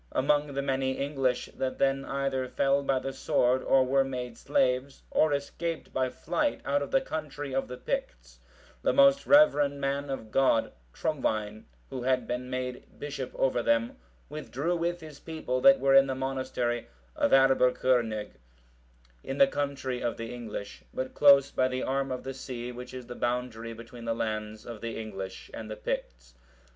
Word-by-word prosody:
Among 145 +1 +1
the 140 - -1
many 135 -1 0
English 135 -2 -1
that 130 -1 -2
then 135 0 +1
either 135 -2 -1
fell 140 +2 +2
by 135 -1 +1
the 135 +1 -3
sword, 130 -1 +2
or 135 -1 +4
were 135 +1 +3
made 125 -3 -5
slaves, 130 +3 0
or 155 - +3
escaped 155 +4 -3
by 130 -1 +1
flight 295 - -1
out 145 0 +1
of 140 - -3
the 270 - +3
country 145 - -5
of 135 - 0
the 125 - -7
Picts, - - -4 0.4
the - - +2
most 275 0 +5
reverend 145 - +5
man 140 +1 -1
of 110 -5 -5
God, 130 -4 +3 0.2
Trumwine,(728) 110 -8 -1 0.3
who 130 - -4
had 130 -1 +1
been 125 +1 -4
made 130 -1 -5
bishop 140 -3 -5
over 130 -2 +1
them, 115 0 +1 0.3
withdrew 150 +2 -2
with 175 +1 -1
his 155 -3 -11
people 155 -6 -3
that 185 +4 +7
were 135 0 +3
in 135 0 +7
the 130 - -2
monastery 130 -2 -2 0.3
of - - +2
Aebbercurnig,(729) 125 -4 +3 0.9
in 135 - -4
the 185 - +8
country 140 -6 -3
of 120 - -2
the 115 +1 -5
English, 110 -4 -7
but 130 0 -4
close 140 -1 +6
by 130 - +2
the 130 0 -2
arm 135 0 -1
of 125 - -4
the 135 - -5
sea 125 -2 -6
which 125 +1 -8
is 125 -1 -7
the 120 - -7
boundary 120 -2 -2
between 115 +1 -10
the 115 0 0
lands 110 -1 -3
of 115 -3 -8
the 115 -1 -4
English 95 -4 -7
and 110 -1 -7
the 110 - -5
Picts. - - -5
130 Hz, 175 wpm, -29 LUFS, 120-140 Hz, 0.9 s, the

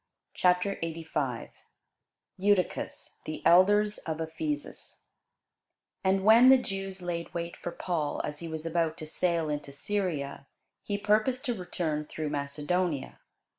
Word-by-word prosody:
CHAPTER 180 +2 +2
85 155 -7 -3 0.9
EUTYCHUS 195 -1 0
THE 155 - -6
ELDERS 205 +4 +5
OF 160 -1 -4
EPHESUS 295 - -4 1.0
AND 190 0 +2
when 230 +5 +8
the 265 - +9
Jews 195 -5 -4
laid 170 -1 -3
wait 170 0 -3
for - - -5
Paul, 170 -4 -2
as 150 0 -4
he 170 - -6
was 160 0 -5
about 165 -1 0
to 155 - -5
sail 165 +1 0
into 145 -1 -3
Syria, 145 -4 -2 0.3
he 205 - -2
purposed 215 +5 +1
to 245 - +1
return 165 -6 -2
through 155 0 -4
Macedonia. 145 +1 -1
170 Hz, 130 wpm, -29 LUFS, 155-195 Hz, 1.0 s, the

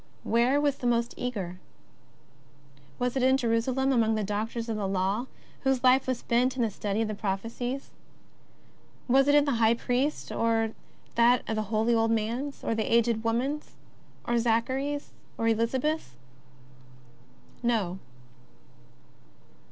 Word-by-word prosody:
Where 240 +5 +3
was 285 -1 +1
the 245 - -2
most 235 0 +1
eager? 195 -8 -4 1.4
Was 250 0 -1
it 265 - +1
in 260 +1 +4
Jerusalem 255 +2 +1
among 225 -3 +2
the 215 - -1
doctors 220 +3 -3
of 225 - -2
the 205 -2 -2
Law, 195 +6 -1 0.3
whose 265 -2 0
life 260 +1 +5
was 255 -2 0
spent 250 +2 +1
in 250 - 0
the 225 - 0
study 205 +2 -1
of - - -2
the 215 - -3
prophecies? 230 +6 -4 1.2
Was 270 +2 +4
it 290 0 +5
the 285 - +1
High 225 +1 +5
Priest's, 250 +5 -1
or 225 -1 +1 0.4
that 235 +1 +3
holy 220 +1 0
old 225 0 +2
man's, 230 +6 -2
or - - 0
the 220 -1 -2
aged 230 -1 +3
woman's, 255 +6 -1 0.5
or 240 0 +1
Zach 230 +1 +1
ary's, 285 +2 -3 0.2
or 225 - 0
Elizabeth's? 230 - 0 1.5
No. 215 -7 0
235 Hz, 135 wpm, -28 LUFS, 220-260 Hz, 1.5 s, life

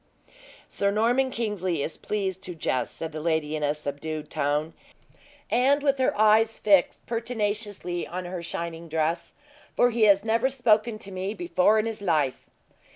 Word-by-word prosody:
"Sir 200 - 0
Norman 240 +6 +2
Kingsley 190 - -2
is 160 - -4
pleased 190 -3 -3
to 180 -2 -6
jest," 130 -5 -2
said 165 -1 -5
the 155 - -6
lady, 160 -2 0
in 155 - -3
a 145 0 +1
subdued 150 +1 -5
tone, 150 +1 -1 0.8
and 275 +4 +3
with 275 -2 +2
her 260 - +1
eyes 220 +1 +4
fixed 195 -4 +3
pertinaciously 210 -6 -3
on 180 +1 -5
her 175 0 -5
shining 170 0 -5
dress; 160 +2 -1 0.4
"for 245 - +4
he 225 -1 +3
has 200 0 +5
never 230 +4 +2
spoken 235 -4 +2
to 200 -2 -9
me 190 +3 -3
before 220 - +2
in 215 - +1
his 225 -2 -4
life!" 155 -8 0
195 Hz, 160 wpm, -26 LUFS, 165-225 Hz, 0.8 s, has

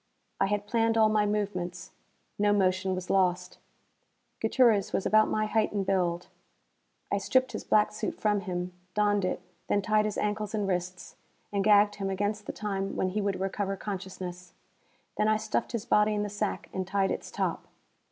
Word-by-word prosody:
I 195 - +3
had 205 0 -1
planned 225 0 +1
all 220 -1 +5
my 210 -1 +2
movements. 185 -4 -3 0.5
No 205 0 +4
motion 185 -1 +1
was 185 -1 -4
lost. 180 -1 +1 0.8
Gutierrez 225 -7 +3
was - - 0
about 215 0 +4
my 215 0 +1
height 215 0 +1
and 200 -2 -1
build. 180 -3 0 0.9
I 200 - +1
stripped 255 +6 +2
his - - -5
black 210 0 +3
suit 210 0 -4
from 210 -1 +2
him, 180 -2 -4 0.2
donned 205 -1 +2
it, - - -2 0.3
then 205 - +1
tied 215 0 +2
his 215 - -2
ankles 210 0 -1
and 205 -2 -1
wrists, 180 -1 -3 0.4
and 200 -1 +1
gagged 205 0 +5
him 195 -1 -2
against 205 +2 -2
the - - -2
time 195 -2 -3
when 185 - 0
he 210 +3 -1
would 200 -2 -1
recover 195 +1 -2
consciousness. 185 -2 -6 0.6
Then 210 - +2
I 215 0 +3
stuffed - - -2
his 230 -2 -3
body 210 -2 +3
in 205 - 0
the 205 - -3
sack 205 0 -3
and 185 -1 -3
tied 195 0 +1
its - - -4
top. - - -2
205 Hz, 180 wpm, -29 LUFS, 190-210 Hz, 0.9 s, all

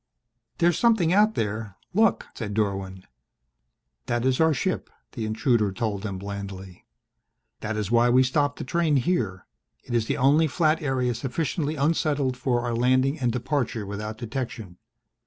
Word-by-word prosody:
"There's 170 -1 +2
something 220 -8 +3
out 215 +2 +4
there 105 -2 -3 0.2
look," 225 +4 +3
said 105 -3 -5
Dorwin. 95 -3 -2 1.0
"That 120 +1 0
is 130 -1 +2
our 160 0 +5
ship," 180 +6 -1 0.2
the 115 -4 -4
intruder 110 -1 +1
told 100 0 -2
them 100 -2 -4
blandly. 100 -2 -8 0.7
"That 110 +1 -3
is 105 0 -2
why 120 +1 +4
we 130 +2 +5
stopped 145 +2 0
the - - -5
train 160 +2 +1
here. 120 - 0 0.4
It - - -7
is 115 -2 +1
the - - -1
only 145 +5 +4
flat 155 +1 +1
area 130 -4 0
sufficiently 145 +5 -2
unsettled 145 -3 +1
for 125 -1 0
our 120 -1 -1
landing 130 +5 +2
and 125 -3 +1
departure 120 -3 -2
without 105 +2 -5
detection. 115 -5 -5
125 Hz, 155 wpm, -25 LUFS, 110-145 Hz, 1.0 s, our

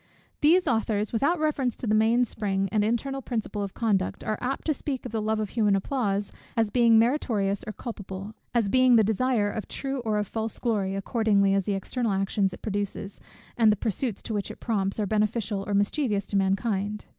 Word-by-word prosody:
These 335 +4 +4
authors, 220 -3 0
without 285 +10 +2
reference 285 -6 0
to - - -6
the 215 - +1
main 225 +3 +4
spring, 195 -4 -2
and 215 -2 +2
internal 270 +5 -1
principle 225 -4 -3
of 200 -1 -5
conduct, 205 -5 0
are 215 - -2
apt 260 +2 -2
to 310 - +2
speak 270 -2 -4
of - - -5
the 225 -1 -1
love 215 0 0
of 215 -2 -2
human 210 -4 +2
applause, 200 -2 -1 0.3
as 225 -2 +2
being 235 -1 +5
meritorious 220 -5 +1
or 215 - -4
culpable, 200 -2 -7 0.2
as 235 -4 +1
being 255 +3 +5
the 220 - +6
desire 220 0 +1
of 215 - -5
true 275 -1 -3
or 220 -3 -1
of 210 - 0
false 220 +1 -3
glory, 200 -5 -1
accordingly 200 -1 +2
as 195 -1 +1
the 205 - 0
external 225 +3 -2
actions 195 0 +1
it - - -11
produces, 205 -1 -4 0.3
and 225 -2 +5
the - - +2
pursuits 220 +1 -2
to 225 - -4
which 205 -2 -2
it - - -9
prompts, 200 -3 -1
are 210 - +1
beneficial 210 0 0
or 205 - 0
mischievous 205 0 +1
to - - -5
mankind. 200 +1 0
215 Hz, 200 wpm, -26 LUFS, 200-235 Hz, 0.3 s, the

